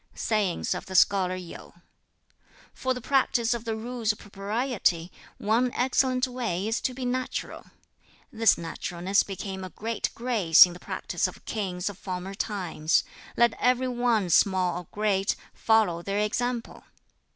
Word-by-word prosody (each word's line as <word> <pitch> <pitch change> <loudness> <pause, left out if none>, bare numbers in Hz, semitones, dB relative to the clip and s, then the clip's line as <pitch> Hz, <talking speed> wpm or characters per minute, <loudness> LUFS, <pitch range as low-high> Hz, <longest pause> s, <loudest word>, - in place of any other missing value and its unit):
'" - - -35
Sayings 205 -6 0
of - - -6
the 190 - -6
Scholar 185 -1 +4
Yu: 180 -2 -10 1.0
"For 260 0 -1
the 250 - -6
practice 245 -2 +2
of 235 -1 -5
the 225 -1 -2
Rules 230 0 -1
of 210 - -8
Propriety, 200 -4 -1 0.3
one 235 +4 +1
excellent 255 0 +2
way 230 -7 -2
is 225 - -1
to 255 - -2
be 260 0 -4
natural. 255 +1 -3 0.6
This 225 -1 +4
naturalness 175 +3 -1
became 190 -1 -5
a 185 - -6
great 225 +5 -3
grace 220 -11 +6
in 175 - -7
the 175 - -11
practice - - -2
of - - -12
kings 190 -4 -3
of 205 -1 -5
former 185 0 -5
times; 190 -6 0 0.3
let 235 -1 +4
everyone, 245 -6 +1
small 185 -1 +3
or 175 - -11
great, 200 -2 +1 0.2
follow 215 -7 +2
their 200 +3 -3
example. 235 +3 -2
210 Hz, 150 wpm, -27 LUFS, 185-240 Hz, 1.0 s, grace